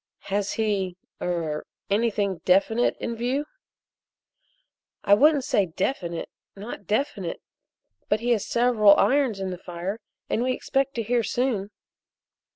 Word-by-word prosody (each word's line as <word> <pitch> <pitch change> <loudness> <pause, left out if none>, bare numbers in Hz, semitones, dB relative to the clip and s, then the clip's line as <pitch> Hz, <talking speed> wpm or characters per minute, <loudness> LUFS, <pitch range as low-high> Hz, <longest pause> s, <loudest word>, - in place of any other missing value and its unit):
"Has 200 0 0
he 195 -5 -1 0.2
er 165 -4 -2 0.3
anything 205 -4 +1
definite 200 +6 +3
in 235 - -3
view?" 255 +5 -1 1.6
"I 200 - +5
wouldn't 290 +5 +5
say 200 -5 +2
definite, 170 -1 -2 0.3
not 205 -1 -8
definite, 210 - -1 0.7
but 210 - +2
he 240 +2 0
has 220 -4 +2
several 230 -4 +5
irons 260 -7 +2
in 190 -1 -3
the 180 - -6
fire 180 +4 -5 0.3
and 225 - 0
we 255 +1 +1
expect 270 +1 -1
to 230 - -1
hear 240 +2 +1
soon." 230 -4 -1
210 Hz, 130 wpm, -25 LUFS, 190-245 Hz, 1.6 s, I